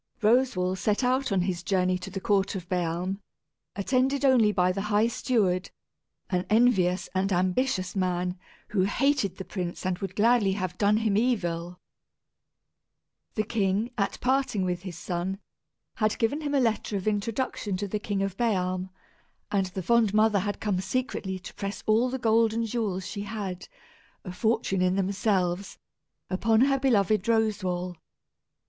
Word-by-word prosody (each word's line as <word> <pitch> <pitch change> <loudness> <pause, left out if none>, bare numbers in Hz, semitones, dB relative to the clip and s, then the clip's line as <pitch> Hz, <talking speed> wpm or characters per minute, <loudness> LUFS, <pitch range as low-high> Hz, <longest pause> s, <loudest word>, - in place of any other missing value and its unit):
Roswal 210 -5 +3
set 210 +5 0
out 255 0 +1
on 190 -2 +2
his 180 -1 -2
journey 185 0 +1
to 185 - -7
the 195 0 -5
court 200 -1 +1
of 180 -2 -6
Bealm, 180 +2 -1 0.6
attended 260 +6 +1
only 240 -6 +5
by 180 -2 +2
the 195 +2 -3
high 210 +1 +3
steward, 210 -6 0 0.6
an 180 -1 +1
envious 210 -5 +3
and 190 +1 0
ambitious 185 +2 0
man, 180 -1 -1 0.3
who 200 - +1
hated 205 -3 +1
the 190 - -6
prince 180 -1 -5
and 185 -1 -1
would 190 -1 -5
gladly 215 -2 +3
have 185 -3 -3
done 210 +1 +4
him 220 -2 +1
evil. 180 -7 -1 1.6
The 215 - +1
king, 210 +1 0
at 200 -3 -1
parting 255 -6 +1
with 180 -1 -2
his 185 -4 -7
son, 180 +2 -3 0.6
had 215 -1 +1
given 255 +6 0
him 290 -1 -1
a - - +4
letter 220 -4 0
of 195 - -5
introduction 215 -1 -1
to 205 +2 -3
the 210 +2 -2
King 205 -1 -2
of 195 -2 -3
Bealm; 185 -5 0 0.6
and 195 -2 +1
the 185 +1 -5
fond 225 -1 +3
mother 215 -1 +4
had 205 +2 -3
come 200 -4 -1
secretly 190 -2 -2
to 180 - -10
press 200 -1 -5
all 225 +4 +3
the 260 - -2
gold 225 -2 +3
and 230 0 0
jewels 210 -5 -2
she 205 - -5
had, 200 -3 -5 0.6
a 180 - -5
fortune 195 -1 0
in 180 0 +2
themselves, 195 -1 0 0.5
upon 220 +4 +2
her 275 +1 +3
beloved 215 -6 +2
Roswal. 190 -6 0
200 Hz, 160 wpm, -27 LUFS, 185-225 Hz, 1.6 s, only